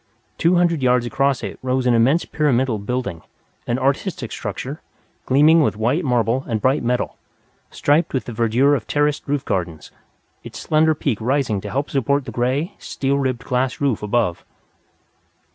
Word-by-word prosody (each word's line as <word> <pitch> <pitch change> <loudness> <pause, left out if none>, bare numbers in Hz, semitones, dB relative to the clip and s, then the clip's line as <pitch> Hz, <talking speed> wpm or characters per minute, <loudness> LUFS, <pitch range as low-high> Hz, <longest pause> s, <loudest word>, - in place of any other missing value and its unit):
Two 170 +2 +3
hundred 170 -4 +2
yards 125 -1 +2
across 135 +2 0
it - - -6
rose 130 0 -1
an 125 - +3
immense 130 +9 +3
pyramidal 130 -6 +1
building 100 -6 -3 0.5
an 120 - 0
artistic 135 - -1
structure, 130 +8 -5 0.5
gleaming 150 +5 +5
with 145 - +1
white 125 +11 0
marble 125 -1 +1
and 115 -3 -1
bright 130 +6 +2
metal, 125 +1 -1 0.5
striped 150 +4 +1
with 130 - -2
the 120 - -6
verdure 120 +6 +3
of 115 -6 -5
terraced 145 0 0
roof 140 -1 -1
gardens, 85 -4 -3 0.5
its - - -9
slender 155 0 +2
peak 130 -7 -2
rising 120 -4 0
to - - -6
help 140 +2 -2
support 140 0 0
the - - -6
gray, 135 +9 -1
steel 140 +1 -1
ribbed 130 -3 -2
glass 125 0 -1
roof 140 -6 0
above. 105 -4 0
130 Hz, 160 wpm, -21 LUFS, 120-145 Hz, 0.5 s, gleaming